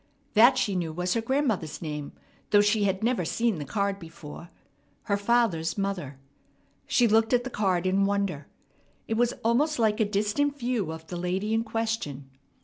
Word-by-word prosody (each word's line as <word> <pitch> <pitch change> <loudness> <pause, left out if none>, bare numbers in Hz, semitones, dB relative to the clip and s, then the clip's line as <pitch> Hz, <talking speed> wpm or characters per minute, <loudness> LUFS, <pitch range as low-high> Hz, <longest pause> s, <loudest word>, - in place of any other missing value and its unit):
That 240 +4 +6
she 205 -6 0
knew 170 -3 -1
was 180 +3 -1
her 230 - 0
grandmother's 230 - -1
name, 150 -3 -5 0.4
though 205 -1 +6
she 205 0 +2
had 195 +1 -1
never 235 -5 +1
seen 225 +1 0
the 145 - -5
card 200 +6 -1
before 165 -1 -10 0.5
her 200 - 0
father's 200 -6 +1
mother. 185 -9 -3 0.7
She 245 - +4
looked 225 +2 +3
at 245 0 +3
the 260 - -6
card 190 -5 0
in 195 +1 +2
wonder. 200 -8 -1 0.6
It - - -1
was 240 +1 +2
almost 275 +7 +2
like 220 -2 +2
a 220 - +3
distant 210 +8 0
view 240 - -1
of 160 0 -8
the 175 +2 -6
lady 185 +5 -1
in 225 0 +1
question. 220 - -3
205 Hz, 175 wpm, -27 LUFS, 175-230 Hz, 0.7 s, That